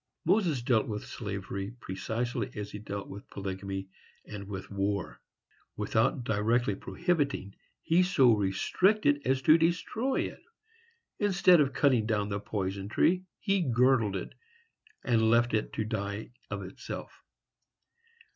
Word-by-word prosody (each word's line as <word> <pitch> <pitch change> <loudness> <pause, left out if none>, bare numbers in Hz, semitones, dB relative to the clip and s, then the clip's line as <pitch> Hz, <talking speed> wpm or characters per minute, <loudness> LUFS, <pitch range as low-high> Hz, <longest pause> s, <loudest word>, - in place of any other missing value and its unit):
Moses 165 - +2
dealt 120 -3 +2
with 105 -1 -4
slavery 100 0 -5
precisely 115 +4 -3
as 105 0 -5
he 105 - -6
dealt 100 -1 -6
with 100 +2 -10
polygamy 95 0 -5 0.4
and 100 -2 -8
with 95 -1 -7
war: 100 -1 -2 0.6
without 125 - +1
directly 110 +1 +1
prohibiting, 145 - -1 0.3
he 170 +3 +4
so 135 -10 +5
restricted 145 - +2
as 130 0 +1
to 155 +6 +6
destroy 195 +10 0
it; - - -5 0.8
instead 195 -4 +5
of 135 -2 +1
cutting 125 -7 +3
down 105 -2 0
the 100 0 -2
poison 100 -1 -3
tree, 180 +10 +2
he 195 -1 +1
girdled 125 - +3
it, 95 - -5 0.7
and 110 -2 +3
left 120 +1 +3
it 110 - 0
to 110 - -1
die 105 0 -4 0.2
of 100 -1 -4
itself. 95 +1 -8
110 Hz, 130 wpm, -30 LUFS, 100-140 Hz, 0.8 s, to